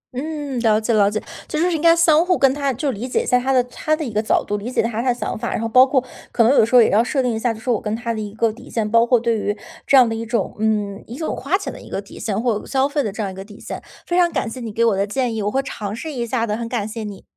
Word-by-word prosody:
嗯， 290 -1 -4
了 220 -2 +3
解 220 +2 -1
了 205 -2 +4
解。 215 +1 -2 0.3
就 - - -3
是 350 +3 +2
应 315 - -1
该 335 0 +6
相 330 -1 +5
互 360 -1 +2
跟 270 -1 +4
他 280 -1 -1
就 270 +3 -2
理 235 +2 -5
解 250 - 0
在 250 - +3
他 260 +2 -1
的 255 -2 +4
他 305 +5 -1
的 310 -1 -4
一 235 - -6
个 210 - +1
角 215 - +1
度， 205 - -2
理 210 +4 -5
解 - - -2
他 230 0 -2
他 255 - 0
的 - - +4
想 245 - -4
法， - - -3
然 - - -1
后 230 - -1
包 255 +3 +6
括 260 -1 +1 0.3
可 230 - +3
能 235 +4 +5
有 280 - +5
时 230 - 0
候 245 - +9
也 - - +2
要 215 +3 +4
设 265 +3 0
定 245 -2 0
一 220 - -2
下， 235 +1 +1
就 220 - -11
是 225 - -16
我 225 - 0
跟 210 0 -2
他 235 0 -3
的 220 - -4
一 205 -1 -5
个 225 0 +1
底 250 +4 -14
线。 220 -2 -1
包 230 +1 +5
括 245 -1 +4
对 230 0 0
于， 205 0 -2 0.3
这 275 - +6
样 250 -2 +7
的 225 - -2
一 225 0 -4
种 230 -3 -2
嗯， 210 -2 -1
一 240 - -8
种 315 - -3
花 310 +9 0
钱 390 - -6
的 - - -11
一 - - -13
个 - - -3
底 200 - -13
线。 215 - -2
或 230 -4 +1
者 - - -12
消 270 0 +1
费 290 0 -1
的 210 - -2
这 215 - -5
样 195 - -3
一 - - -10
个 190 - -7
底 205 0 -14
线。 - - -7 0.3
非 350 - 0
常 345 -1 +3
感 - - -1
谢 255 - -7
你 230 -3 -5
给 230 - +1
我 225 -3 +3
的 195 +1 +1
建 245 +2 -1
议， 220 - -2
我 205 - 0
会 270 - +1
尝 210 -5 -5
试 315 +7 -6
一 240 -3 -2
下 230 0 0
的， 210 - -1
很 235 0 -4
感 225 -4 -2
谢 220 +1 -6
你。 205 -2 -8
235 Hz, 375 characters per minute, -20 LUFS, 215-265 Hz, 0.3 s, 候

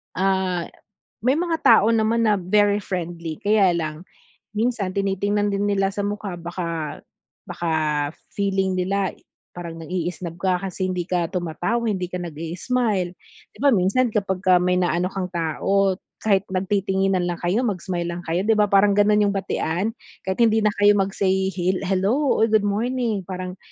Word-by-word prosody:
Ah, 190 -2 0 0.5
may 255 +3 +3
mga 335 -1 0
tao 210 - +6
naman 225 +1 +2
na 210 - +4
very 205 +3 +3
friendly 170 -3 -4
kaya 205 -3 +4
lang 155 -1 -4 0.5
minsan 220 -4 0
tinitingnan 200 +1 0
din 200 +1 0
nila 195 -1 +1
sa - - -6
mukha 205 -2 -3
baka 170 -3 -4 0.5
baka 170 -1 -3 0.6
feeling 195 -2 0
nila 190 +1 0 0.4
parang 170 -2 -6
nang-i-isnob 175 0 -4
ka 185 -2 +1
kasi 185 0 -2
hindi 180 -1 -2
ka 175 -2 +1
tumatawa 180 +7 -1
hindi 180 - -2
ka 180 0 -5
nag-i-smile. 175 +5 -1 0.4
'Di - - -20
ba, 280 -1 +4
minsan 200 +6 +2
kapagka 190 -3 +2
may 180 0 +2
naano 180 0 +1
kang 190 -2 -3
tao 185 +4 +1 0.2
kahit 200 -3 +2
nagtitinginan 190 0 +1
lang 175 -1 -2
kayo 185 +8 +1
mag-smile 180 -4 -2
lang 175 0 -4
kayo 175 +4 0
'di 225 - +4
ba, 210 -1 +2
parang 200 +1 +5
ganun 210 +1 +4
yung 200 - +1
batian. 195 +1 -1 0.3
Kahit 190 0 -3
hindi 220 0 +3
na 210 - +3
kayo 205 0 +6
mag-say 190 -1 +1
hil 185 0 -1
hello 200 +9 +1
o 225 - +5
good 220 -2 +2
morning, 220 0 -1
parang 185 0 -6
190 Hz, 155 wpm, -23 LUFS, 180-205 Hz, 0.6 s, tao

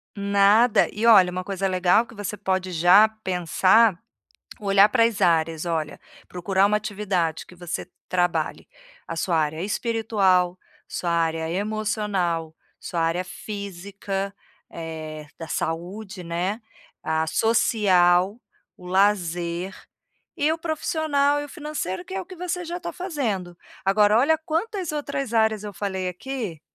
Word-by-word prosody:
Nada, 200 +3 +4
e 225 +3 0
olha, 190 -5 +7
uma 185 0 -4
coisa 195 0 -2
legal 185 +5 +3
que 230 - -15
você 205 0 -5
pode 190 -2 -1
já 180 +6 +6
pensar, 185 +3 +3 0.6
olhar 200 0 +5
para 230 -2 +4
as 230 -3 0
áreas, 165 -1 +2
olha, 160 -3 -2 0.3
procurar 190 +2 +1
uma 210 +1 +2
atividade 200 -6 -2
que 180 - -15
você 175 -1 -5 0.2
trabalhe 180 -1 -1 0.4
a 165 - -4
sua 165 -1 0
área 155 +2 -1
espiritual, 200 -5 +1 0.3
sua 175 - -4
área 165 -1 0
emocional, 200 -5 -1 0.2
sua 170 - -4
área 165 +3 0
física, 200 0 -5 0.4
eh, 155 -2 -7
da 165 -2 -7
saúde, 185 +5 -4
né, 180 +6 -2 0.4
a 160 0 0
social, 195 -1 +3 0.4
o 180 - -15
lazer, 180 -1 0 0.6
e 305 -1 +2
o 325 - -3
profissional 310 -3 0
e - - -5
o - - -18
financeiro 290 - -4
que - - -11
é 195 - -2
o - - -9
que 370 - -11
você 360 +1 -3
já 345 +1 -4
tá - - -5
fazendo. 225 - -3 0.3
Agora, 210 +2 +4
olha 315 +5 +4
quantas 345 +3 -2
outras 280 -4 -3
áreas 220 -2 +2
eu 205 - -6
falei 190 -1 -3
aqui, 210 - -6
195 Hz, 140 wpm, -24 LUFS, 175-220 Hz, 0.6 s, olha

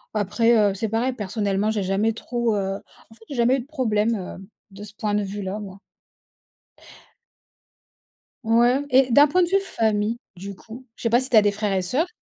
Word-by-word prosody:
Après, 225 +3 +2
heu, - - -4
c'est 210 +3 -3
pareil, 235 +4 0
personnellement, 205 -2 -1
j'ai 215 -2 -1
jamais 195 +4 0
trop, 235 0 -2
heu, 195 -1 -2
en 225 - -21
fait, 225 - -19
j'ai 285 - -6
jamais 245 +2 +3
eu - - -3
de 245 - -8
problème, 230 -6 0
hem, 190 -1 -8 0.2
de 200 +1 -11
ce 210 -1 -11
point 210 0 -2
de 210 - +1
vue-là, 200 0 -5
moi. 200 -2 -9 2.6
Ouais. 240 +4 +3
Et 260 -1 +4
d'un 285 +5 +7
point 360 +5 +2
de - - +1
vue 390 +2 +3
famille, 220 - -1 0.2
du 195 +2 -8
coup, 230 +7 -12
je - - -13
sais 230 - +1
pas 235 +2 +4
si 260 +1 -4
tu 235 - +4
as - - +8
des 205 - +3
frères 205 0 -2
et 190 - +1
soeurs? 265 - 0
220 Hz, 205 wpm, -23 LUFS, 200-240 Hz, 2.6 s, as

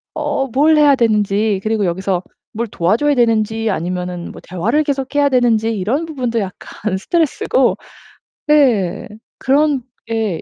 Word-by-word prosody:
어 295 -3 -1
뭘 300 +6 +3
해야 290 -2 +5
되는지 210 -3 +1
그리고 215 -2 0
여기서 185 +1 -1 0.3
뭘 230 +2 -3
도와줘야 215 +12 +1
되는지 225 -2 +1
아니면은 180 -1 -3
뭐 - - -12
대화를 215 - 0
계속 275 -2 -3
해야 285 -1 +3
되는지 235 -4 +2
이런 255 - -1
부분도 250 -7 -2
약간 195 +1 -5
스트레스고 270 - +1 0.7
네. 240 - +2 0.3
그런 280 0 +2 0.3
예 215 -7 -1
225 Hz, 300 characters per minute, -17 LUFS, 195-280 Hz, 0.7 s, 해야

